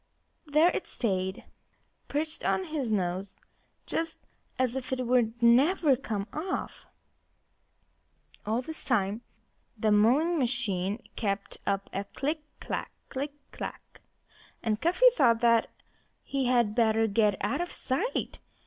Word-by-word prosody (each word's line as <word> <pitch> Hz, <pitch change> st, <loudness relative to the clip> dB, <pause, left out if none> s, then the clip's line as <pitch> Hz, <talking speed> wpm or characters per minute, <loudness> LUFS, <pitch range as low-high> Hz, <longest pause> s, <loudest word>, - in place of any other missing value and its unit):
There 305 Hz, +4 st, +5 dB
it -, -, -3 dB
stayed, 190 Hz, -4 st, -2 dB, 0.6 s
perched 310 Hz, +2 st, -3 dB
on 380 Hz, -, +1 dB
his 305 Hz, -9 st, -3 dB
nose 190 Hz, -1 st, -1 dB, 0.5 s
just 330 Hz, 0 st, -2 dB, 0.4 s
as 255 Hz, -1 st, +1 dB
if 265 Hz, -1 st, -4 dB
it 255 Hz, -1 st, -1 dB
would 240 Hz, -1 st, +1 dB
never 275 Hz, +5 st, +5 dB
come 215 Hz, -6 st, -4 dB
off. 355 Hz, +5 st, -4 dB, 1.6 s
All 225 Hz, +4 st, -1 dB
this 320 Hz, +4 st, -6 dB
time 210 Hz, -3 st, +1 dB, 0.6 s
the 215 Hz, 0 st, +2 dB
mowing 270 Hz, +11 st, +4 dB
machine 220 Hz, -6 st, -1 dB
kept 200 Hz, -2 st, -3 dB
up 195 Hz, 0 st, 0 dB
a 195 Hz, +1 st, -2 dB
click 300 Hz, +9 st, -3 dB, 0.2 s
clack -, -, -4 dB, 0.2 s
click 280 Hz, +1 st, -3 dB, 0.2 s
clack! -, -, -8 dB, 0.6 s
And 220 Hz, -1 st, 0 dB
Cuffy 365 Hz, +9 st, +3 dB
thought 235 Hz, -, +4 dB
that 230 Hz, -1 st, +4 dB, 0.5 s
he 270 Hz, -2 st, -1 dB
had 240 Hz, -4 st, +3 dB
better 225 Hz, -1 st, +3 dB
get 210 Hz, -2 st, +2 dB
out 210 Hz, -, -1 dB
of 350 Hz, -, -3 dB
sight. 350 Hz, -, -2 dB
240 Hz, 125 wpm, -29 LUFS, 210-290 Hz, 1.6 s, There